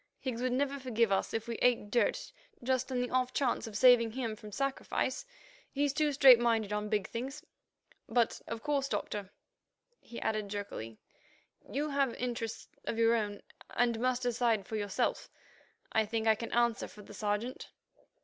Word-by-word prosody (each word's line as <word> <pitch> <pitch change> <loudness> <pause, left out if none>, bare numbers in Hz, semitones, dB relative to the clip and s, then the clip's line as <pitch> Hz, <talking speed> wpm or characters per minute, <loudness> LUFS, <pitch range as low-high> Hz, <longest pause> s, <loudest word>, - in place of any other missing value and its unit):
"Higgs 250 -3 -3
would 255 0 0
never 280 +1 0
forgive 230 -4 +1
us 195 - +1
if 225 0 -3
we 235 - -3
ate 230 -4 +2
dirt 250 - +1 0.3
just 260 +1 0
on 250 -1 0
the 250 - -2
off 255 0 +1
chance 250 -4 0
of 210 -2 -5
saving 240 -3 +6
him 235 -4 -2
from 210 0 -11
sacrifice. 275 - -2 0.4
He's 285 0 0
too 300 0 +2
straight 265 -4 +8
minded 225 -3 +1
on 210 0 -2
big 205 -3 0
things. 265 +5 -5 0.7
But, 235 0 +1
of 230 0 -5
course, 280 -2 0
Doctor," 205 -7 -3 0.7
he 235 - -9
added 215 -2 -1
jerkily, 195 - -5 0.7
"you 295 +2 -1
have 275 -4 +1
interests 230 -3 -4 0.2
of 225 - -2
your 230 0 +4
own 205 -3 -2 0.3
and 235 -1 +2
must 255 +1 0
decide 235 -4 +1
for 220 - -5
yourself. 205 -2 -1 0.6
I 220 -1 +2
think 225 +1 -1
I 220 - +6
can 230 +2 -5 0.2
speak - - -7
for 210 - -13
the 205 - -12
Sergeant." 210 +4 -3
235 Hz, 170 wpm, -32 LUFS, 215-255 Hz, 0.7 s, straight